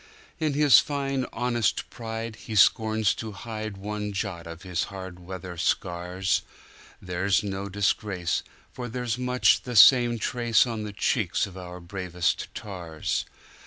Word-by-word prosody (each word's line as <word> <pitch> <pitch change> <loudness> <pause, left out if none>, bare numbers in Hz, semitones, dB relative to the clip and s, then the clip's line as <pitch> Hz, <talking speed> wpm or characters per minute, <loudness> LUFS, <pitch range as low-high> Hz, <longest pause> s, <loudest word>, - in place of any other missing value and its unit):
In 155 -3 0
his 150 -1 +7
fine 135 -3 -1
honest 120 -1 0
pride, 115 -1 -5
he 110 +3 -7
scorns 110 +1 +4
to 110 -2 -6
hideOne 105 -1 -5
jot 95 -4 -4
of 85 0 -9
his 90 -2 -1
hard 95 -2 -8
weather 90 0 -8
scars; 90 +2 0 0.6
They're 90 +1 -3
no 100 0 -4
disgrace, 95 -3 0 0.3
for 125 -1 -5
there's 125 0 -2
much 125 0 +3
the 125 -1 -6
same 120 +1 +7
traceOn 115 -1 +1
the 105 - -6
cheeks 105 0 +1
of 95 -2 -11
our 90 -1 -8
bravest 90 -1 -2
tars. 85 -6 -3
105 Hz, 130 wpm, -26 LUFS, 90-115 Hz, 0.6 s, his